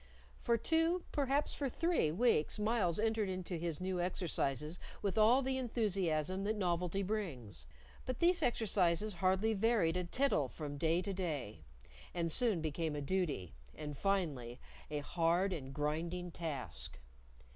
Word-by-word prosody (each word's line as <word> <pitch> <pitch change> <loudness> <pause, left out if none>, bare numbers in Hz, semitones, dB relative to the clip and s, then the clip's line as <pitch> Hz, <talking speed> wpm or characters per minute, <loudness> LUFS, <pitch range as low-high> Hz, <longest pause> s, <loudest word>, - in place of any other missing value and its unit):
For 235 - +2
two, 330 +6 +2
perhaps 280 0 +1
for 280 -2 -2
three, 335 - +1
weeks 195 -3 +2
Myles 210 -5 +1
entered 220 -2 +1
into 185 -1 -3
his 165 -2 -2
new 185 -1 -1
exercises 160 -3 -1 0.2
with 200 -2 0
all 230 +5 +5
the 265 0 0
enthusiasm 190 - 0
that 215 +1 0
novelty 180 0 0
brings; 165 - -4 0.4
but 255 -1 -2
these 350 +1 +4
exercises 210 - +2
hardly 190 +5 +2
varied 205 -5 +2
a 180 - 0
tittle 180 - +2
from 145 +1 -6
day 165 +3 +2
to 200 - -3
day, 155 - -3 0.5
and 165 -1 0
soon 215 -3 +2
became 155 0 -2
a 145 - -3
duty, 145 - -1 0.2
and 150 -1 -6
finally 140 -10 -1 0.3
a 150 -1 -2
hard 175 +5 +1
and 135 -6 -5
grinding 165 +5 -2
task. 155 -6 -4
180 Hz, 145 wpm, -36 LUFS, 160-220 Hz, 0.5 s, all